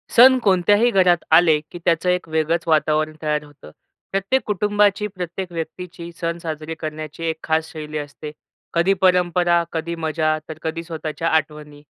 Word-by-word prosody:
सण 260 +2 +8
कोणत्याही 205 +4 +4
घरात 180 -4 +3
आले, 160 -2 +6
की 175 - -8
त्याचं 170 +1 +2
एक 180 -1 0
वेगळचं 160 +2 0
वातावरण 155 0 +1
तयार 150 -1 -1
होतं. 145 - -15 0.4
प्रत्येक 195 +7 +1
कुटुंबाची 205 0 +1
प्रत्येक 185 -1 -6
व्यक्तीची 170 +1 -7
सण 170 0 -1
साजरे 160 -1 -5
करण्याची 155 0 -6
एक 160 - -3
खास 160 0 0
शैली 155 -1 -6
असते. 150 +1 -7 0.4
कधी 170 +3 +3
परंपरा, 175 -2 +3
कधी 170 +1 -3
मजा 155 -1 0
तर 160 - -6
कधी 165 +1 -3
स्वतःच्या 160 0 -4
आठवणी. 150 -1 -2
165 Hz, 150 wpm, -21 LUFS, 155-180 Hz, 0.4 s, सण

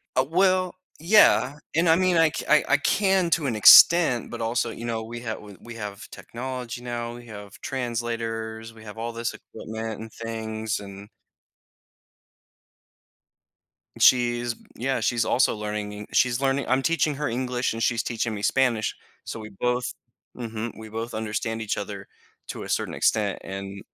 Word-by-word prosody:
Uh 130 +1 +3
well, 185 +1 +2 0.2
yeah, 165 -5 +5 0.2
and 165 +1 +3
I 160 - +7
mean, 185 0 +2
I 165 -1 +5
c 155 - -5
I 150 0 +5
I 145 - +4
can 190 +3 +2
to 155 -4 +2
an 120 - -1
extent, 140 - +7
but 120 - -6
also, 115 +1 0
you 115 - -7
know, 115 -1 -2
we 120 +1 -7
have 110 -2 -5
we 105 -2 -12
we 115 - -10
have 105 0 -7
technology 125 -1 -6
now, 120 -1 -4
we 120 0 -12
have 105 -2 -10
translators, 115 -3 -4
we 110 -1 -15
have 105 0 -10
all 115 +1 -3
this 115 0 -3
equipment 110 0 -7
and 110 0 -9
things 110 -1 -4
and 100 0 -10 2.9
She's 120 -1 +4 0.2
yeah, 130 +1 -1
she's 115 +1 +1
also 125 +2 +2
learning 105 -1 -4
En 105 0 -8
she's 125 0 +2
learning 135 0 +1
I'm 130 +1 +2
teaching 155 -1 +1
her 145 +1 -2
English 125 0 -1
and 115 0 -3
she's 120 -2 +2
teaching 115 -1 -2
me 105 - -5
Spanish, 115 -2 +1 0.3
so - - -6
we 110 -1 -8
both 125 +5 -1 0.4
mhm, 115 -1 -5
we 110 0 -9
both 115 +2 -5
understand 110 +1 -3
each 105 - -2
other - - -6 0.4
to - - -6
a - - -8
certain - - -1
extent - - +1
and 95 +1 -7
115 Hz, 170 wpm, -25 LUFS, 110-130 Hz, 2.9 s, I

